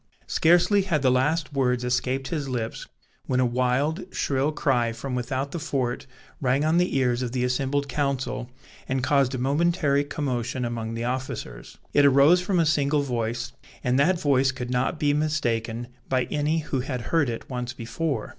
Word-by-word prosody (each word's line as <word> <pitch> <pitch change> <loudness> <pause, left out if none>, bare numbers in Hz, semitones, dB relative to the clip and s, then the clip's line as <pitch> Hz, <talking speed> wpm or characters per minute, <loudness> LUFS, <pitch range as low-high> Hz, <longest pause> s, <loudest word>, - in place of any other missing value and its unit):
Scarcely 175 +5 +4
had 170 -7 0
the 130 - +4
last 145 +4 +1
words 125 -3 +1
escaped 130 +2 -1
his 145 -5 -3
lips 115 -3 -4 0.4
when 130 - +1
a 130 - +4
wild, 130 +7 0
shrill 140 +2 0
cry 125 -6 +1
from 130 +3 -5
without 130 +2 -2
the 170 - -4
fort 130 -5 -2 0.3
rang 135 +2 +2
on 160 +2 +3
the 180 -5 +1
ears 125 -2 +1
of 125 -1 -3
the 125 -1 0
assembled 135 +3 0
council, 135 -2 -2 0.4
and 130 0 0
caused 135 -1 +2
a - - -2
momentary 145 +2 +2
commotion 130 -4 -2
among 115 -1 -4
the 115 - -3
officers. 120 - -5 0.2
It 145 - +5
arose 140 +6 +6
from 180 0 0
a 165 - +3
single 145 -1 +2
voice, 120 -1 -3 0.3
and 125 +2 +2
that 175 +5 +3
voice 135 -3 +3
could 125 -1 -6
not 125 +5 0
be 145 -2 +2
mistaken 120 -6 -1 0.2
by 130 -1 +2
any 150 +2 +1
who 145 -3 -2
had 125 -1 -3
heard 145 +1 +1
it 115 - -5
once 125 -2 -4
before. 135 +5 -3
135 Hz, 175 wpm, -25 LUFS, 125-145 Hz, 0.4 s, arose